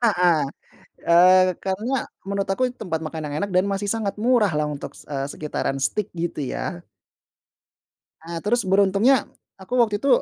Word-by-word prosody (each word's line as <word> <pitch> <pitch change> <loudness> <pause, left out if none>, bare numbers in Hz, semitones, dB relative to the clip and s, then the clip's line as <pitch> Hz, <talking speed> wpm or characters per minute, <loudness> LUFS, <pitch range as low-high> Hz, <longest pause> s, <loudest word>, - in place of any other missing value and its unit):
Heeh. 180 -8 +3 0.6
Eee, 185 +2 +6
karena 200 +6 -2 0.3
menurut 200 0 -2
aku 195 +7 0
itu 250 - -11
tempat 165 -6 -2
makan 155 0 -5
yang 145 - -5
enak 200 - -2
dan 185 +1 +4
masih 200 +1 -2
sangat 220 -3 -1
murah, 230 -2 +3
lah, 150 - +1
untuk, 150 -1 -5
se - - -15
eee, 135 -1 -2
sekitaran 150 -3 -3
steak, 210 +7 -1
gitu, 170 -2 -3
ya. 175 -1 -5 1.3
Nah, 170 +1 -7
terus 240 +4 +2
beruntungnya, 200 +6 +4 0.4
aku 190 +6 -13
waktu 215 -3 +3
itu 275 - +1
190 Hz, 165 wpm, -23 LUFS, 170-210 Hz, 1.3 s, Eee